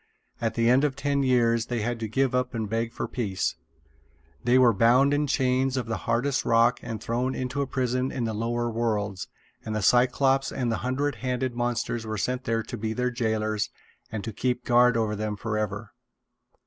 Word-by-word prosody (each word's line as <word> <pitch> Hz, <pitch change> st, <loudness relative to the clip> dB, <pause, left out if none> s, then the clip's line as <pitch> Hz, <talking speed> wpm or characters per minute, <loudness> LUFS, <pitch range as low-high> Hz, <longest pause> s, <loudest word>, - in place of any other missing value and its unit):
At 115 Hz, -1 st, -1 dB
the 115 Hz, 0 st, +2 dB
end 125 Hz, +3 st, +5 dB
of 145 Hz, -3 st, +1 dB
ten 140 Hz, 0 st, 0 dB
years 120 Hz, -3 st, +2 dB
they 120 Hz, -2 st, -2 dB
had 120 Hz, +2 st, -2 dB
to 110 Hz, -, -3 dB
give 130 Hz, +4 st, +1 dB
up 125 Hz, -1 st, 0 dB
and 110 Hz, -2 st, -2 dB
beg 115 Hz, +2 st, -1 dB
for -, -, -4 dB
peace. 100 Hz, -7 st, -2 dB, 0.9 s
They 125 Hz, +1 st, +4 dB
were 125 Hz, -3 st, +6 dB
bound 125 Hz, +7 st, +4 dB
in 145 Hz, 0 st, +1 dB
chains 130 Hz, 0 st, +1 dB
of 125 Hz, -, -1 dB
the 115 Hz, -1 st, -2 dB
hardest 130 Hz, +4 st, +1 dB
rock 115 Hz, +1 st, +3 dB
and 115 Hz, -2 st, -5 dB
thrown 125 Hz, +5 st, -1 dB
into 130 Hz, +2 st, -2 dB
a 140 Hz, -, -1 dB
prison 130 Hz, 0 st, -1 dB
in 125 Hz, -, -3 dB
the 110 Hz, -1 st, -1 dB
Lower 120 Hz, +2 st, -1 dB
Worlds; 105 Hz, -4 st, -2 dB, 0.4 s
and 110 Hz, -, -4 dB
the 105 Hz, -, -1 dB
Cyclopes 135 Hz, +4 st, +3 dB
and 125 Hz, -3 st, -1 dB
the 115 Hz, -, 0 dB
hundred 130 Hz, +1 st, -1 dB
handed 125 Hz, 0 st, -2 dB
monsters 120 Hz, -1 st, -2 dB
were 110 Hz, -1 st, -4 dB
sent 125 Hz, +5 st, -2 dB
there 115 Hz, 0 st, 0 dB
to 120 Hz, -, -7 dB
be 110 Hz, +1 st, -2 dB
their 125 Hz, +1 st, -1 dB
jailers 110 Hz, -3 st, -1 dB, 0.4 s
and 105 Hz, -2 st, -4 dB
to 115 Hz, -, -5 dB
keep 125 Hz, +2 st, -1 dB
guard 125 Hz, 0 st, +4 dB
over 110 Hz, -2 st, 0 dB
them 105 Hz, 0 st, -3 dB
forever. 105 Hz, -1 st, -3 dB
120 Hz, 200 wpm, -26 LUFS, 110-130 Hz, 0.9 s, were